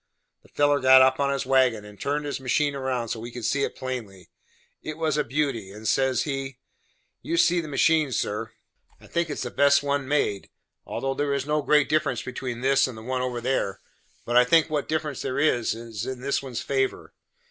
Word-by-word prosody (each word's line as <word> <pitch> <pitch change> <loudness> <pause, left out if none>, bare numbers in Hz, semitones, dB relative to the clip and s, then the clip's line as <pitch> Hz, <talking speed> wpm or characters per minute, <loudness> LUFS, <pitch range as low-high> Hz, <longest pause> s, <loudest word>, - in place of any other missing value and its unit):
The - - -23
feller 145 0 +2
got 130 0 +7
up 130 0 +3
on 140 0 +1
his 140 -1 -2
wagon, 130 -5 +2
and 105 -1 -13
turned 145 +1 -1
his 145 - -3
machine 140 +2 0
round 130 -4 -2
so 115 - -3
we 115 +2 -7
could 120 -2 -7
see 140 0 +1
it - - -2
plain 110 -8 -6 0.6
it 155 0 -6
was 160 -2 0
a 150 - +1
beauty 130 -6 -2
and 105 +2 -7
says 130 -2 +2
he: 135 -3 -4 0.6
"You 335 - -2
see 175 - +4
this 155 - -8
machine, 150 +1 +2
sir; 105 -2 -2 0.5
I - - -17
think 170 -1 -1
it - - -2
is - - -4
the 125 - -5
best 140 0 +4
one 140 -1 -1
made, 130 -9 0 0.4
although 135 0 -2
there 140 0 -1
is 140 -1 -2
no 150 +1 0
great 150 0 +3
difference 150 -5 0
between 125 -2 -5
this 135 +1 +3
and 125 -3 -8
the 110 - -10
one 130 +1 -2
over 125 -1 -2
there; 115 -6 -1 0.5
but 120 - -2
I 125 - +8
think 160 +5 +3
what 150 -2 -2
difference 155 -3 -2
there 130 - -3
is, 125 -7 +1
is 115 0 -6
in 130 -1 -5
this 140 +1 0
one's 130 -4 -5
favor. 135 -1 -2
135 Hz, 215 wpm, -25 LUFS, 125-145 Hz, 0.6 s, I